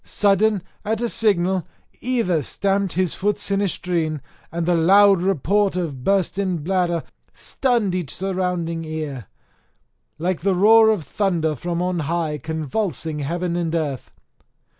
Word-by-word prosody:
Sudden 205 -1 +2 0.2
at 215 +1 -1
a 240 - 0
signal 190 -5 +1 0.3
either 230 -10 0
stamped 195 +5 -1
his 185 0 0
foot 205 +1 0
sinistrine, 180 -5 -1 0.3
and 170 0 -2
the 175 - +2
loud 195 +3 +5
report 195 +2 +1
of 155 -8 -3
bursten 190 -2 0
bladder 175 -2 0 0.3
stunned 235 -8 0
each 175 -7 -3
ear 195 +1 -2
surrounding, 165 -6 -3 0.9
like 180 0 -1
the 190 +1 +1
roar 220 +4 +6
of 210 -7 +1
thunder 170 -4 0
from 170 +5 -3
on 180 -1 -1
high 160 -1 -2
convulsing 160 - -3
heaven 170 +4 -2
and 170 -1 -1
earth. 145 -6 -3
180 Hz, 130 wpm, -22 LUFS, 165-200 Hz, 0.9 s, roar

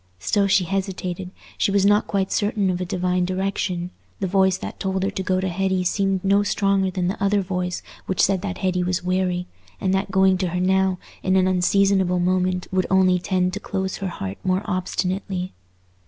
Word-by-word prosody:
Still 195 - +1
she 195 -1 +4
hesitated; 185 -1 -3 0.3
she - - +2
was 200 0 +2
not 205 +1 +4
quite 195 -1 -1
certain 205 -2 +1
of 180 0 -3
a - - -1
divine 180 -1 0
direction; 185 -1 -2 0.3
the 195 - -1
voice 190 0 +3
that - - -7
told 190 -1 -1
her 195 - 0
to 190 - -4
go 185 0 0
to 190 - -1
Hetty 190 +1 0
seemed 195 0 0
no 200 +1 +4
stronger 195 -2 +1
than 180 -1 -1
the 195 +1 -2
other 200 0 +3
voice 180 -1 -3 0.2
which 190 - -2
said 190 -2 +3
that 195 -2 -4
Hetty 185 -1 0
was 180 0 -1
weary, 180 -1 0 0.3
and 190 -1 0
that 195 +1 0
going 190 -1 +3
to 185 - 0
her 180 +1 -2
now 190 0 +2 0.2
in 185 0 +1
an 185 -1 +4
unseasonable 185 0 +2
moment 180 0 0
would 185 -1 +1
only 185 -1 +4
tend 185 0 0
to 205 - -3
close 190 -2 -3
her 195 - -3
heart 95 - -6
more 185 +1 +1
obstinately. 185 0 -2
185 Hz, 200 wpm, -23 LUFS, 180-195 Hz, 0.3 s, she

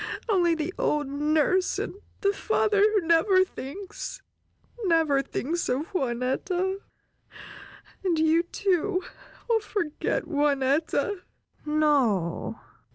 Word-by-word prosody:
Only 350 -6 +3
the 320 +3 -3
old 295 -1 +1
nurse, 305 +6 +1
and - - -3 0.3
the 400 -1 +2
father 420 0 +1
who 420 -1 +4
never 370 +3 +4
thinks, 370 +4 -7 0.6
never 320 -6 +3
thinks 310 +5 -3
of 275 +6 -1
Juanetta! 350 +8 -1 1.2
And 355 -4 +1
you, 320 +1 +4
too, 370 +1 0 0.4
will 460 -2 +3
forget 380 -7 -2
Juanetta!" 295 - 0 0.5
"No! 275 - +1
325 Hz, 95 wpm, -26 LUFS, 290-380 Hz, 1.2 s, who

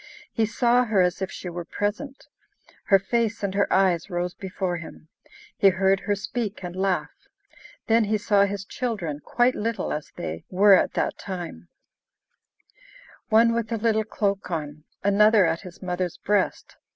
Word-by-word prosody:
He 225 -2 +1
saw 240 +2 +2
her 215 -4 +1
as 180 +1 -1
if 190 - -2
she - - -7
were 175 0 -5
present; 220 +11 -4 0.6
her 195 - +6
face 225 +2 -1
and 195 -1 -1
her 200 0 +1
eyes 185 -3 +2
rose 175 0 -2
before 185 -2 -3
him; 160 -1 -11 0.5
he 195 - +5
heard 190 +1 +2
her 205 - -1
speak 210 0 -4
and 175 0 -6
laugh. 190 -1 -2 0.6
Then 225 0 +3
he 215 +1 +1
saw 205 -1 +3
his 200 0 -4
children, 195 - -3
quite 245 +1 +2
little, 225 +1 -2
as 150 0 -6
they 80 +1 -5
were 200 +2 +6
at 190 - +3
that - - -1
time: 180 -3 -7 1.6
one 230 +1 +5
with 230 0 -2
a 230 - 0
little 220 0 +1
cloak 200 -3 -2
on, 155 -2 -5 0.2
another 205 0 +5
at 165 0 -1
his 185 +2 -12
mother's 180 -1 -3
breast. 205 -2 -1
200 Hz, 165 wpm, -25 LUFS, 180-220 Hz, 1.6 s, her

